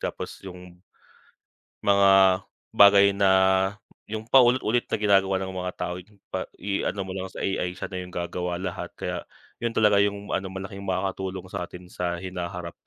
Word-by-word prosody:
tapos - - -5
yung 90 -1 -12 1.1
mga 95 -1 +5 0.3
bagay 100 0 +7
na 100 -1 +3 0.8
yung 110 0 -4
paulit-ulit 120 -1 +4
na - - 0
ginagawa 95 -2 +3
ng 95 0 -4
mga 90 0 -3
tao 90 0 -3 0.4
pa 95 - -2
i-ano 100 0 -2
mo 95 - -7
lang 95 0 -4
sa - - -13
AI 90 -2 -1
siya - - -4
na 90 - -4
yung 90 - -9
gagawa 90 0 -3
lahat, 90 0 -5
kaya - - -3 0.4
yun 115 -1 -1
talaga 105 -2 +4
yung 100 0 -1
ano 95 0 -1
malaking 95 +1 -7
makakatulong 95 0 -3
sa 90 -3 -4
atin 90 - -11
sa 90 -1 -2
hinaharap. 90 -1 -5
95 Hz, 160 wpm, -25 LUFS, 90-100 Hz, 1.1 s, bagay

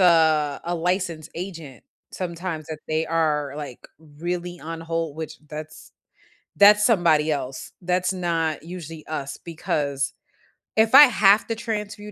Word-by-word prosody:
uh, 160 -5 +4
a 175 +1 -1
licensed 170 -2 -2
agent, 165 - -8 0.3
sometimes 170 -3 -4
that 155 -1 -5
they 155 +1 0
are, 155 -3 0
like, 145 -5 -8 0.3
really 175 +1 -3
on 165 +1 -6
hold, 165 -2 -3
which 160 -1 -6
that's 155 +1 -9 0.6
that's 210 +1 +7
somebody 165 -8 +3
else. 135 -3 -4
That's 180 +1 0
not 165 -4 -1
usually 165 -2 -8
us 140 -3 -4
because 140 -4 -2 0.6
if 220 +3 +4
I 290 - +12
have 210 -5 +4
to 230 - -2
transfer 220 -2 -4
you 210 - -8
165 Hz, 140 wpm, -24 LUFS, 155-185 Hz, 0.6 s, I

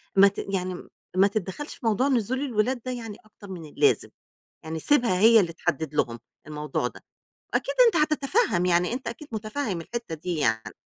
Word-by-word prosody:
ما 195 +1 +8
ت 200 - -3
يعني 185 -2 -3 0.3
ما 195 +2 +5
تتدخّلش 205 - -4
في - - -12
موضوع 225 +5 +2
نزول 255 0 0
الولاد 245 -2 0
ده 255 - -2
يعني 225 -4 -6
أكتر 210 -1 -15
من 175 -4 -7
اللازم، 150 - +2 0.5
يعني 160 0 -4
سيبها 235 - +3
هي 225 +1 +7
اللي 170 -4 0
تحدد 160 -3 -2
لهم 115 -5 0 0.3
الموضوع 150 0 -2
ده، - - -12 0.5
أكيد - - 0
أنت 445 - +2
هتتفهّم 305 - +2
يعني 180 +3 +2
أنت 255 0 -5
أكيد 235 +6 -6
متفهّم 215 -3 -3
الحتّه 230 -1 -5
دي 170 +2 -4
يعني. 110 -6 0
205 Hz, 175 wpm, -26 LUFS, 175-250 Hz, 0.5 s, ما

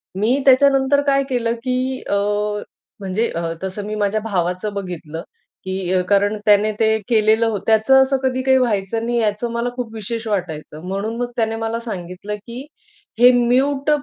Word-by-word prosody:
मी 230 +8 +1
त्याच्यानंतर 275 +1 +4
काय 275 0 +3
केलं, 235 -2 0
की 255 0 -1
अ, - - 0 0.9
म्हणजे 195 +4 -1
अ, 165 0 -2
तसं 190 +2 -4
मी 215 +1 -4
माझ्या 205 +1 0
भावाचं 185 0 -2
बघितलं, 175 -4 -6 0.4
की 190 -1 -3
अ, 185 - +3
कारण 205 +1 +2
त्याने 210 +1 +4
ते 220 0 +3
केलेलं 220 0 +3
होतं. 210 -4 -2
त्याचं 225 +5 +5
असं 265 0 +2
कधी 260 0 0
काही 265 0 +4
व्हायचं 225 -2 0
नाही, 240 0 0
याचं 220 +2 -1
मला 235 +1 -1
खूप 240 -3 -5
विशेष 225 +1 -4
वाटायचं. 160 -6 -4
म्हणून 200 +4 -3
मग 245 0 -3
त्याने 225 -2 0
मला 225 +1 -3
सांगितलं, 195 -2 -6
की 235 +6 -9 0.5
हे 245 +1 +8
म्यूट 270 +4 +2
220 Hz, 165 wpm, -20 LUFS, 200-245 Hz, 0.9 s, हे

